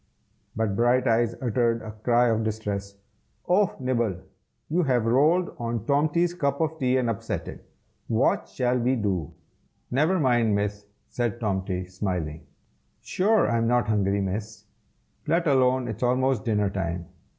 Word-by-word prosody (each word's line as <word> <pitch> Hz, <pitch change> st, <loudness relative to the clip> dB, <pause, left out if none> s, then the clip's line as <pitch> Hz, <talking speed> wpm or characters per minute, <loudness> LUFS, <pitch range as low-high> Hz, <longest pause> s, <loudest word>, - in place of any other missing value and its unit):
But 110 Hz, -3 st, -1 dB
Brighteyes 120 Hz, 0 st, +2 dB
uttered 115 Hz, -1 st, +1 dB
a 110 Hz, -, -6 dB
cry 120 Hz, +3 st, +2 dB
of 110 Hz, 0 st, +1 dB
distress. 105 Hz, -2 st, -4 dB, 0.5 s
"Oh! 195 Hz, +2 st, +2 dB
Nibble, 120 Hz, -6 st, 0 dB, 0.5 s
you 170 Hz, +4 st, +1 dB
have 125 Hz, -7 st, +1 dB
rolled 155 Hz, +10 st, +2 dB
on 115 Hz, -2 st, -3 dB
Tomty's 155 Hz, +5 st, +2 dB
cup 140 Hz, -5 st, -1 dB
of 160 Hz, 0 st, -1 dB
tea 130 Hz, -1 st, +2 dB
and 125 Hz, -2 st, 0 dB
upset 115 Hz, -3 st, -3 dB
it. -, -, -9 dB, 0.4 s
What 115 Hz, +3 st, +1 dB
shall 125 Hz, -1 st, 0 dB
we 125 Hz, +2 st, +1 dB
do?" 95 Hz, -, -2 dB, 0.6 s
"Never 155 Hz, +9 st, +2 dB
mind, 120 Hz, -6 st, +2 dB
Miss!" 105 Hz, 0 st, -3 dB, 0.2 s
said 120 Hz, -2 st, -2 dB
Tomty, 95 Hz, -4 st, -2 dB
smiling, 90 Hz, -4 st, -4 dB, 0.6 s
"sure 210 Hz, +3 st, +2 dB
I'm 115 Hz, -1 st, +1 dB
not 120 Hz, -1 st, +2 dB
hungry, 100 Hz, -2 st, +1 dB
Miss, 105 Hz, +2 st, -4 dB, 0.6 s
let 170 Hz, +3 st, +2 dB
alone 130 Hz, -3 st, +3 dB
it's 110 Hz, -1 st, -6 dB
almost 130 Hz, 0 st, +1 dB
dinner 105 Hz, -3 st, +1 dB
time. 85 Hz, -3 st, -3 dB
115 Hz, 140 wpm, -25 LUFS, 105-130 Hz, 0.6 s, alone